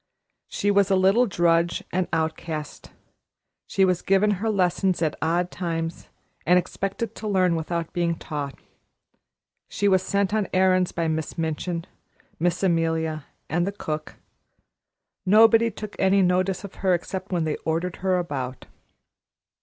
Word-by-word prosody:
She 205 - 0
was 200 -1 +3
a 195 - +4
little 195 +6 +4
drudge 170 -2 +1
and 180 0 0
outcast; 160 -1 -3 0.8
she 190 - +3
was 180 -1 +1
given 195 +2 +3
her 225 - 0
lessons 185 -2 +1
at 155 - 0
odd 175 +3 0
times 165 -2 -4 0.3
and 180 +1 +4
expected 195 +4 -3
to 220 - -6
learn 185 -4 +2
without 165 0 -3
being 170 -1 0
taught; 145 -3 -5 1.1
she 205 - 0
was 190 -2 +4
sent 200 +1 0
on 215 -2 +1
errands 185 -1 +3
by 165 -1 -1
Miss 160 +1 -3
Minchin, 165 +1 -2 0.5
Miss 175 +2 0
Amelia 160 -3 0 0.2
and 175 +3 0
the - - -1
cook. 155 -6 -5 1.1
Nobody 225 +3 +6
took 215 -1 -8
any 190 0 +4
notice 185 +1 +1
of 200 - -8
her 190 -2 +3
except 185 +3 -5
when 175 -3 +1
they 155 -1 -1
ordered 165 +3 -2
her 185 -1 +1
about. 135 -7 -4
180 Hz, 145 wpm, -24 LUFS, 165-195 Hz, 1.1 s, Nobody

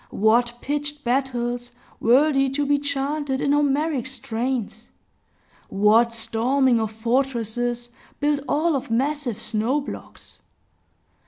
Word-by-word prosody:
What 235 +3 +2
pitched 290 +1 -3
battles, 245 -1 -1 0.3
worthy 270 +3 +4
to 285 +2 -1
be 285 0 +2
chanted 280 0 -1
in 280 - +1
Homeric 290 -2 +1
strains! 245 -3 -3 0.8
What 215 +4 +4
storming 230 +3 +1
of 220 -1 -2
fortresses, 240 0 -1 0.3
built 290 0 +1
all 310 +2 +2
of 265 - -3
massive 260 0 -1
snowblocks! 230 +6 -3
260 Hz, 100 wpm, -23 LUFS, 230-285 Hz, 0.8 s, worthy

